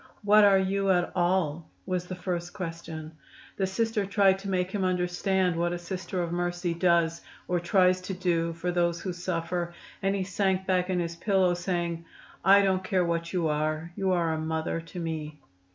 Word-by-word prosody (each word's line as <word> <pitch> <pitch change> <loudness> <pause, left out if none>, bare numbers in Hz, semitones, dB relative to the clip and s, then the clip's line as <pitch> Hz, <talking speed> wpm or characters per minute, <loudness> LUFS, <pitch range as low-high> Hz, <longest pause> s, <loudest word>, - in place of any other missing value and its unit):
"What 210 +1 +6
are 200 -1 +6
you, 195 +1 0
at 180 -2 +2
all?" 175 -3 0 0.2
was 180 -1 -2
the 185 - -5
first 175 -1 -4
question. 165 -3 -6 0.5
The 190 - +1
Sister 225 +2 0
tried 195 -1 +3
to 195 0 -6
make 185 -1 0
him 200 -1 -1
understand 180 0 +1
what 175 +1 0
a - - -2
Sister 180 0 -4
of 170 - -4
Mercy 175 0 -1
does, 170 -1 +2 0.3
or 180 -1 +1
tries 185 +1 +3
to 185 +1 -5
do 170 -2 0
for 170 +2 -2
those 170 -1 +1
who 185 - -3
suffer, 175 -1 -3 0.3
and 195 0 +1
he 195 - -1
sank 190 0 0
back 185 -1 +1
in 185 -1 +1
his 170 -1 -3
pillow, 185 0 +2
saying, 175 -2 -2 0.4
"I 200 +1 +7
don't 190 -1 +1
care 185 -1 +1
what 170 0 -2
you 175 -3 0
are; 155 +2 -1
you 190 -1 0
are 170 -3 +1
a 160 - -2
mother 160 +1 -2
to 165 +2 -9
me." 155 -3 -4
180 Hz, 190 wpm, -28 LUFS, 170-190 Hz, 0.5 s, I